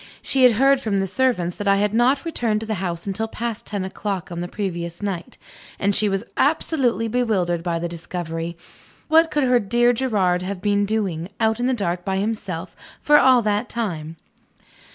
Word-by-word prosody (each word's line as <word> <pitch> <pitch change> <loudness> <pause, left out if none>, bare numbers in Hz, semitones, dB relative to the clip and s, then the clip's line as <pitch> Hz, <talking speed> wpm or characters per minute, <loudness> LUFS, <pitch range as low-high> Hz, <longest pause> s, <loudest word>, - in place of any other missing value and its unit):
She 270 - +1
had 245 - +6
heard, 270 +4 +4
from 215 -5 -1
the 195 - +1
servants, 190 -4 0
that 205 - -4
I 200 - +5
had 205 +1 +1
not 255 +6 +2
returned 235 -10 0
to - - -4
the 220 - -2
house 170 -2 -3
until 205 +3 -2
past 230 0 -5
ten 200 -2 -3
o'clock 190 -2 -4
on 170 - -4
the 175 - -3
previous 175 -2 -4
night; 190 -4 -4 0.4
and 200 +1 +1
she 210 +1 +2
was 195 +1 -1
absolutely 270 -6 +1
bewildered 210 -8 0
by 170 -1 -1
the 170 +1 -2
discovery. 170 0 -5 0.5
What 325 +1 +5
could 295 -2 0
her 250 -1 +4
dear 240 +3 +2
Gerard 205 -8 +1
have 185 +1 -4
been 205 +1 +1
doing, 190 -6 -2
out 220 0 +1
in 245 - +1
the 260 - +1
dark 180 -5 -2
by 190 0 -1
himself, 195 -4 -3 0.2
for 295 0 +5
all 255 -2 +5
that 210 +2 0
time? 165 -9 -4
205 Hz, 195 wpm, -22 LUFS, 180-240 Hz, 0.5 s, had